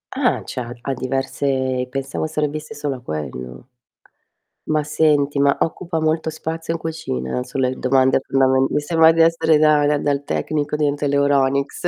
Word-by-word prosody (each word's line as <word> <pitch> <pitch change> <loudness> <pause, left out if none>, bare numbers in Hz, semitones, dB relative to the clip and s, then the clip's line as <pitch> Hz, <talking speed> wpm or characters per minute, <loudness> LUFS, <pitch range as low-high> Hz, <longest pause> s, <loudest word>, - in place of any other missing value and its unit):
Ah, - - +1
cioè, 125 - -4
ha 120 0 -6
ha 135 - -2
diverse 130 0 -1
pensavo 135 +3 -3
servisse 150 0 -3
solo 145 -2 -3
a 125 - -11
quello. 65 - -6 1.0
Ma 155 -1 +1
senti, 150 -2 +1
ma 140 0 +3
occupa 165 0 -2
molto 160 +1 0
spazio 160 +1 -5
in 165 - -4
cucina? 65 - -4
Son 135 - -6
le 130 -1 +2
domande 130 0 +2
fondame 130 0 +3
mi - - 0
sembra 160 +2 +4
di 165 0 +2
essere 165 -1 +4
da 150 -1 +4
dal 145 0 +1
dal 140 -1 0
tecnico 150 0 -2
dentro 145 -1 0
l'Euronics. 140 +1 +1
145 Hz, 160 wpm, -20 LUFS, 130-155 Hz, 1.0 s, sembra